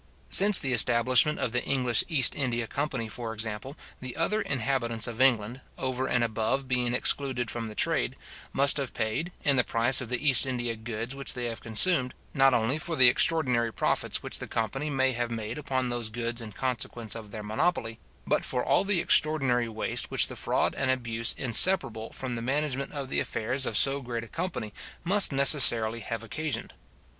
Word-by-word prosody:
Since 205 -1 +10
the 135 -2 +2
establishment 125 +5 +3
of 120 - -3
the 120 +1 -2
English 125 -4 +1
East 140 -7 +5
India 120 -4 -3
company, 140 -2 -5
for 115 +1 -8
example, 110 +6 -5 0.2
the 130 -1 -7
other 210 +7 -1
inhabitants 120 - -2
of 120 0 -5
England, 125 -1 0 0.2
over 130 0 -4
and 125 - -1
above 115 +4 -3
being 125 -1 -1
excluded 125 -3 +1
from 115 -1 -6
the 105 - -10
trade, - - -1 0.4
must 140 +1 +3
have 140 -3 -5
paid, 115 +10 -4
in 140 -2 +1
the 125 - +3
price 120 +4 +3
of 125 - -8
the 125 +4 -3
East 135 0 +6
India 120 -2 -4
goods 115 +2 -7
which 140 0 -2
they 125 -1 -5
have 115 -1 -7
consumed, 130 +4 +1 0.2
not 135 0 +3
only 120 +4 -1
for 165 +2 -6
all - - -4
the 130 -1 +7
extraordinary 125 -6 0
profits 95 - -2
which - - -3
the - - -8
company 135 +6 -4
may 130 -2 0
have 120 -1 -4
made 115 +3 -6
upon 130 -3 -3
those 120 -2 -4
goods 115 +1 -5
in 110 -2 -9
consequence 120 -2 -5
of 110 -2 -9
their 105 +1 -9
monopoly, 115 +1 -3 0.3
but - - -1
for 125 - -3
all - - +1
the 200 -2 -1
extraordinary 130 -6 +2
waste 110 0 -4
which - - +3
the - - -10
fraud - - -2
and 135 - -3
abuse 115 -3 -2
inseparable 120 - +3
from 130 -2 -5
the 115 - -6
management 140 +1 -3
of 140 -3 -7
the - - -1
affairs 125 +4 -2
of 105 - -1
so 140 +6 +2
great 120 -2 -6
a - - -11
company 165 - -6 0.3
must 195 +2 +4
necessarily 125 -5 +6
have 115 +1 -7
occasioned. 150 +7 -6
125 Hz, 190 wpm, -26 LUFS, 115-135 Hz, 0.4 s, Since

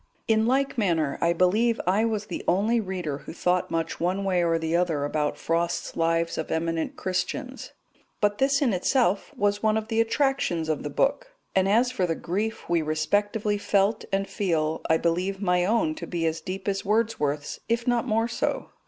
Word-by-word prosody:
In 220 0 +3
like 270 0 +1
manner, 165 -8 +1
I 170 - +3
believe 210 +7 +2
I 195 +5 +2
was 215 -2 -1
the 180 - -5
only 210 +7 +2
reader 180 -8 -3
who - - -9
thought 180 +1 0
much 165 0 -2
one 185 +3 0
way 185 -3 +1
or 165 -1 +2
the 160 0 -1
other 165 -5 +1
about 150 0 -1
Frost's 170 +1 -1
Lives 165 0 0
of 160 - -4
Eminent 165 0 -1
Christians, 255 +8 -3 0.5
but 205 0 +1
this 275 +2 +3
in 240 -6 +2
itself 200 +1 +1
was 205 0 +1
one 215 0 +2
of 220 0 -4
the 225 0 +2
attractions 230 - 0
of 155 - 0
the 150 - -4
book; - - 0 0.2
and 190 0 +2
as 240 +4 +3
for 190 -8 0
the 165 - 0
grief 210 +8 -3
we 170 -1 +2
respectively 205 +7 0
felt 200 +2 +1
and 195 0 0
feel, 160 -6 -1
I 160 - +5
believe 180 +4 -1
my 180 -3 +2
own 270 +10 +2
to - - -6
be 170 -2 -2
as 160 0 -1
deep 190 +2 -6
as 195 -1 -1
Wordsworth's, 195 -10 0
if 230 +1 0
not 240 -1 +1
more 225 +2 +1
so. 235 - -2
195 Hz, 190 wpm, -26 LUFS, 165-220 Hz, 0.5 s, I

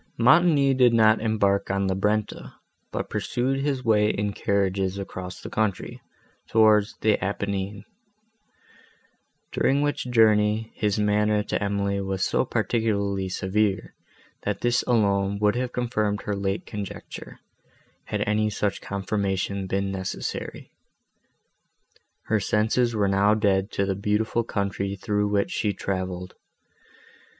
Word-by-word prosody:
Montoni 140 +2 +5
did 125 -2 +4
not 110 -1 +5
embark 105 -3 +1
on 100 0 0
the 95 - +1
Brenta, 105 +2 -2 0.4
but - - -3
pursued 130 +3 -1
his 135 -2 -2
way 105 -2 +4
in 105 -1 -1
carriages 95 -1 0
across 95 -2 -7
the - - -8
country, 110 -3 -2 0.5
towards 110 -1 +3
the 110 -1 +2
Apennine; 100 +1 -3 1.7
during 140 +2 +2
which 145 -3 -2
journey, 110 -1 +3
his 105 -1 -1
manner 105 0 +2
to 105 - -2
Emily 100 0 -1
was 95 -1 -1
so - - +1
particularly 100 -4 -1
severe, 95 +1 -1 0.5
that - - -3
this 120 0 +2
alone 100 -4 +2
would 105 +1 +2
have 125 0 -2
confirmed 110 -4 -1
her 105 - -2
late 100 +1 -2
conjecture, 105 -3 -8 0.7
had - - -3
any 105 0 +1
such 100 -1 -2
confirmation 100 -1 -2
been 100 +1 -1
necessary. 95 -1 -5 1.5
Her 110 - +1
senses 110 +4 +1
were 105 -2 +2
now 100 +2 +3
dead 100 -2 +1
to 100 - 0
the 95 - 0
beautiful 105 +4 0
country, 100 -2 -2
through 105 +1 -1
which 100 -1 0
she 105 -2 0
travelled. 95 -2 -4
105 Hz, 125 wpm, -25 LUFS, 100-110 Hz, 1.7 s, Montoni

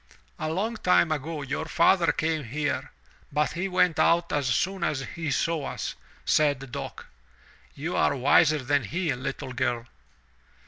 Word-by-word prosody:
"A 155 - -2
long 210 +8 -1
time 180 -4 +3
ago 155 0 -3
your 140 +3 -3
father 170 +1 +4
came 160 -1 -1
here, 145 +4 -2 0.4
but 150 +1 +1
he 175 +3 -2
went 180 -3 +2
out 170 0 +3
as 145 -3 +1
soon 185 +10 0
as 145 -5 0
he 160 +3 -5
saw 155 +2 0
us," - - -4 0.3
said 145 -4 +2
Dock. - - -6 0.7
"You 160 +5 -3
are 140 - +2
wiser 145 +3 +4
than 140 -1 +1
he, 165 - -1
little 130 0 -5
girl." 120 -2 -1
150 Hz, 150 wpm, -27 LUFS, 135-170 Hz, 0.7 s, father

